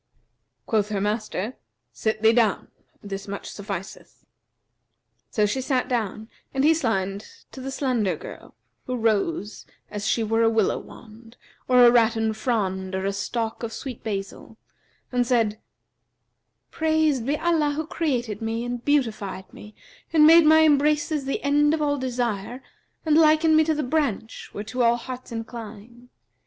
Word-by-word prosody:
Quoth 215 -2 0
her 205 -2 -1
master, 215 +2 -2 0.4
'Sit 220 0 -2
thee 220 +1 +6
down: 225 -4 +1 0.3
this 195 -1 -6
much 200 0 -6
sufficeth.' 195 -2 -8 1.0
So 210 -3 +1
she 235 +6 -1
sat 260 -1 0
down 220 -3 -2 0.3
and 265 - +1
he 315 +2 +6
signed 205 -9 -2 0.2
to 265 - -9
the 265 - -5
slender 250 -8 0
girl, - - -11 0.3
who 255 - -2
rose, 225 +1 -1 0.2
as 210 -1 -4
she 230 - +1
were 225 +1 +1
a 225 - +4
willow 220 -3 +1
wand, 230 +1 -15 0.3
or 250 -1 +6
a 240 - +8
rattan 225 -2 +2
frond 190 -5 -2
or 190 0 -2
a 200 - 0
stalk 225 +3 -3
of 230 -2 -4
sweet 255 0 -7
basil, 200 +1 -6 0.5
and 245 -1 +1
said: 225 -4 +1 1.1
'Praised 315 -6 +1
be 290 +2 +1
Allah 315 -3 +1
who 315 +1 -3
created 250 - -2
me 225 +1 -2
and 245 0 -4
beautified 220 -9 -1
me 210 0 -12 0.4
and 310 -2 +6
made 325 0 +8
my 315 +1 +7
embraces 295 0 +2
the 275 - -3
end 295 +2 +3
of 315 - -5
all 285 -1 0
desire 245 -2 -3 0.4
and 310 -1 +3
likened 315 0 +5
me 315 - +6
to 315 0 +1
the 300 - -1
branch, 250 -6 -2
whereto 220 +5 -4
all 235 0 +4
hearts 250 +1 -8
incline. 230 +1 -9
235 Hz, 155 wpm, -24 LUFS, 215-285 Hz, 1.1 s, a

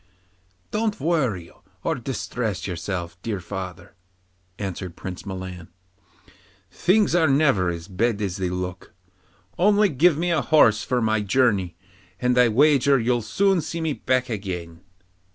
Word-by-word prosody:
'Don't 215 0 -1
worry 130 - -1 0.3
or - - +1
distress 120 -4 -3
yourself, 85 -1 -5
dear 105 -4 -3
father,' 95 -1 -7 0.6
answered 95 -3 -5
Prince 95 +2 -7
Milan. 95 -3 -6 1.0
'Things 195 +2 +2
are 170 -2 +4
never 135 - +3
as 85 0 -5
bad 105 +3 0
as 100 -2 -2
they 95 -2 -1
look. 90 0 -5 0.6
Only 205 +2 +4
give 150 +2 +3
me 175 +2 0
a 160 -4 +2
horse 115 -10 +4
for 125 -2 0
my 110 -1 +1
journey, 105 -5 +1 0.4
and 125 0 +1
I 125 -1 +5
wager 140 +3 +4
you'll 120 +1 +1
soon 190 - +1
see 165 +2 -5
me 160 -2 -1
back 130 -1 0
again. 90 -7 -5
115 Hz, 135 wpm, -23 LUFS, 95-145 Hz, 1.0 s, I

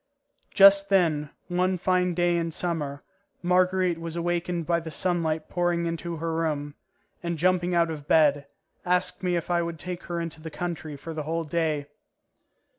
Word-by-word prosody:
Just 195 0 +7
then, 160 -7 +2 0.2
one 180 +1 +1
fine 180 0 +1
day 175 0 +2
in 170 -1 0
summer, 155 -4 -3 0.4
Marguerite 180 -1 +2
was 165 0 -6
awakened 175 0 -1
by 170 +1 +2
the 165 -1 -7
sunlight 160 -1 -1
pouring 175 -1 0
into 170 0 -3
her 165 +1 -3
room, 150 -3 -2 0.5
and, 170 -1 -3
jumping 180 +1 +2
out 170 -1 +3
of 150 -2 -7
bed, 145 -3 +4 0.4
asked 180 0 0
me 180 -1 0
if 170 +1 -2
I 175 0 +3
would 170 -1 -4
take 180 +2 -6
her 175 -1 -3
into 165 -2 -5
the 160 - -6
country 160 -2 -5
for 165 +4 -7
the 155 - -3
whole 165 +2 -2
day. 155 -2 -1
170 Hz, 170 wpm, -26 LUFS, 160-180 Hz, 0.5 s, Just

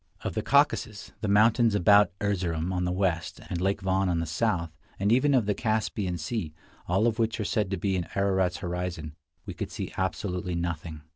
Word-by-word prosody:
Of - - -3
the - - -1
Caucasus, 140 -7 +1
the 110 - -1
mountains 110 +2 +4
about 105 0 +6
Erzerum 90 -4 -1
on 90 -1 -1
the 90 - 0
west, 90 -2 -1
and 85 - -2
Lake 95 +2 0
Van 95 0 +1
on 85 - +1
the 85 - -1
south, 85 0 -1 0.3
and 100 +2 +1
even 135 +4 +4
of 120 -5 +3
the 105 - +1
Caspian 105 -4 -1
Sea, 85 -2 -4 0.3
all 95 +5 +2
of 115 -1 +1
which 115 0 0
are 105 - -1
said 105 -1 0
to 95 - -2
be 95 +2 0
in 90 -2 -2
Ararat's 95 -2 +1
horizon, 85 -3 -4 0.3
we - - -6
could - - -5
see - - -6
absolutely 90 -1 -2
nothing. 85 -2 -4
95 Hz, 200 wpm, -27 LUFS, 85-105 Hz, 0.3 s, about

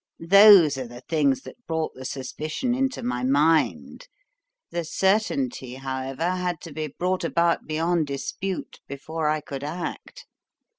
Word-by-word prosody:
Those 195 -8 +8
are 130 - -5
the 120 +1 -11
things 145 -5 +2
that 245 - -13
brought 160 -1 -2
the 130 - -10
suspicion 155 - -3
into 265 +1 -1
my 125 0 -2
mind; 155 - +1 0.6
the 170 0 -2
certainty, 200 - 0
however, 135 +5 -3
had 180 -2 -2
to 165 - -9
be 155 +1 -3
brought 180 +6 -2
about 170 0 +1
beyond 160 +1 0
dispute 180 +7 -5
before 155 +3 -4
I 155 0 0
could 140 -1 -7
act. 175 - -6
160 Hz, 140 wpm, -25 LUFS, 140-180 Hz, 0.6 s, Those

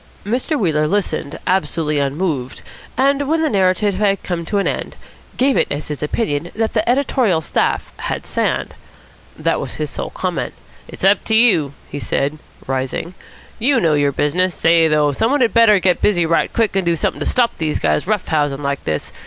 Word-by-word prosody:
Mr. 250 +8 -1
Wheeler 155 -6 +1
listened 185 -6 -2
absolutely 165 -5 0
unmoved, 140 -2 -2 0.3
and, 275 +1 +2
when 320 +1 +2
the 310 - +1
narrative 195 +1 +2
had 195 0 0
come 170 -2 -3
to 205 - -1
an 200 - +1
end, - - -3 0.4
gave 265 +1 +3
it - - +2
as 145 +2 -4
his 150 - -5
opinion 150 -1 -2
that 220 0 -1
the 220 0 0
editorial 245 - +2
staff 160 - -1
had - - -4
sand. - - -1 0.6
That - - 0
was - - -5
his - - -3
sole - - -4
comment. - - -3 0.3
"It's - - -10
up 195 +1 +4
to 220 - +2
you," 175 - +4
he 145 - -6
said, 140 +5 -2 0.3
rising. 135 +6 -3 0.5
"You 255 +2 +3
know 165 -6 +2
your 145 -1 +2
business. 175 +6 0
Say, 165 0 +4
though, 150 -1 +2
some 220 +11 0
one 285 0 +1
had 235 - +2
better 230 -3 +6
get 180 -1 +1
busy 175 -5 +3
right 165 +1 +1
quick 225 -4 0
and 195 - +2
do 170 -1 +1
something - - -2
to - - -3
stop 245 -2 +1
these 155 -2 0
guys 75 - 0
rough 210 -2 -1
housing 145 -3 0
like 140 0 -2
this. 75 -1 -3
180 Hz, 195 wpm, -18 LUFS, 150-220 Hz, 0.6 s, better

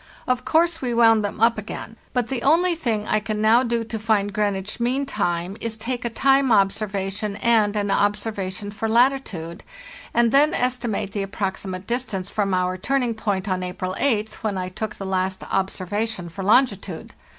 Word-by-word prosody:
Of 255 0 0
course 330 +1 +2
we 245 -3 -1
wound 225 -2 +5
them 205 - -4
up 230 0 +4
again, 220 +1 -7 0.2
but 250 -3 0
the 260 -3 -2
only 340 +6 +4
thing 225 -10 -2
I 215 - +2
can 215 0 -3
now 220 +3 +5
do 235 -2 0
to 225 0 -5
find 205 -2 +1
Greenwich 205 0 -1
mean 255 +4 0
time 175 -5 -2
is 225 -1 -3
take 245 +3 -3
a 235 - -1
time 270 +2 +3
observation 200 0 0
and 220 -3 +2
an 205 -1 0
observation 205 -1 -1
for 220 +2 -3
latitude, 230 -9 +1 0.5
and 235 -1 +3
then 295 +5 +4
estimate 245 -5 -1
the 200 0 -2
approxi 195 0 -3
mate 185 0 -5
distance 235 -6 -2
from 200 -2 -1
our 185 0 0
turning 250 +2 0
point 205 -3 -2
on 185 -1 -1
April 185 +1 -4
8th, 220 -5 0
when 210 -3 -1
I 185 0 -3
took 215 +4 -5
the 195 - -7
last 190 0 -1
observation 195 0 -2
for 195 +4 -6
longitude. 200 -5 +1
215 Hz, 180 wpm, -23 LUFS, 195-235 Hz, 0.5 s, wound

